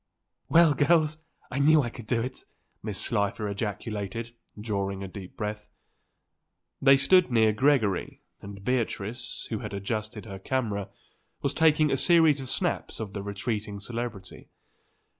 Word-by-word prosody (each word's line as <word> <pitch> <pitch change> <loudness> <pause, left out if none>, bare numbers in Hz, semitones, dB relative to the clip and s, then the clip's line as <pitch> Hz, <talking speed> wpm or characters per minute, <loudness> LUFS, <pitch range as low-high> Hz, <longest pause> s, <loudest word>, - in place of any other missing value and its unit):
"Well, 165 -2 +6
girls, 155 +2 +2 0.3
I 130 - -2
knew 150 +1 +5
I 120 - -4
could 120 -4 -11
do 115 -1 +1
it!" 130 +1 -7 0.4
Mrs. 105 -3 -4
Slifer 105 -1 0
ejaculated, 105 +2 -4 0.3
drawing 100 -2 -2
a - - -5
deep 95 -1 -10
breath. 105 0 -4 1.1
They 135 0 +7
stood 175 +3 +4
near 110 -2 +4
Gregory, 110 -4 +1 0.2
and 100 0 -10
Beatrice, 120 -2 -2
who 110 - -1
had 105 -2 -6
adjusted 105 +2 -4
her 95 -3 -8
camera, 105 -3 -2 0.5
was - - 0
taking 155 -2 +4
a 135 - +2
series 160 -2 +5
of 130 -2 -6
snaps - - -1
of 105 -3 -5
the 100 - -4
retreating 105 0 -4
celebrity. 115 -1 -6
110 Hz, 140 wpm, -27 LUFS, 100-135 Hz, 1.1 s, They